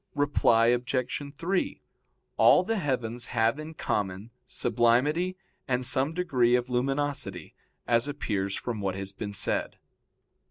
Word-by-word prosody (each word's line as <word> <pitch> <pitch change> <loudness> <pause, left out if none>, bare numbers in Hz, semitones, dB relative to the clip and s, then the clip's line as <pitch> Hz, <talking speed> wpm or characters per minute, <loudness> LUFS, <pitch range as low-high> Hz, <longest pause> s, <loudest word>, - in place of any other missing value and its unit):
Reply 130 -5 +3
Obj. 125 +2 -1
3: 180 +5 -1 0.5
All 180 - +6
the 225 +4 -1
heavens 125 - -2
have 115 +5 +2
in 155 +1 -8
common 100 -2 -3 0.2
sublimity 150 +10 +1 0.3
and 125 -1 0
some 140 +5 +1
degree 125 -9 +2
of 125 +1 -1
luminosity, 135 - -2 0.3
as 115 +2 +3
appears 100 -9 -2
from 115 -4 -4
what 95 -1 -1
has 95 0 -4
been 100 +1 -6
said. 100 - 0
125 Hz, 125 wpm, -28 LUFS, 110-145 Hz, 0.5 s, All